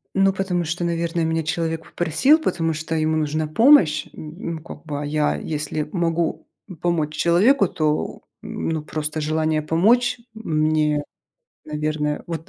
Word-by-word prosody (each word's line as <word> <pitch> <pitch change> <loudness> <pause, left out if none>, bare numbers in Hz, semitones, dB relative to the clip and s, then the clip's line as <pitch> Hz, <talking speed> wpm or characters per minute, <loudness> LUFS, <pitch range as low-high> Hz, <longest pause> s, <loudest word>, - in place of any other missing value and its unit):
Ну, 195 0 +4
потому 185 -2 -1
что, 170 +3 -3
наверно, 170 0 -1
меня 160 0 0
человек 165 0 -2
попросил, 175 - +3
потому 165 - 0
что 155 +1 -4
ему 155 0 +1
нужна 155 0 -1
помощь. 170 - +5
М, 165 +2 -6
м, 155 - -13
как - - -10
бы, 145 -2 -4
а 145 - -3
я, 150 0 +1
если 155 0 -3
могу 170 -2 -1 0.3
помочь 160 -4 0
человеку, 195 - +4
то, 155 -2 -1 0.2
ну, 160 -2 -3
просто 155 0 -3
желание 155 0 0
помочь 220 +12 +2
мне, 155 -7 0 0.6
наверное, 150 0 -2
вот 165 -2 -6
160 Hz, 145 wpm, -22 LUFS, 155-175 Hz, 0.6 s, помощь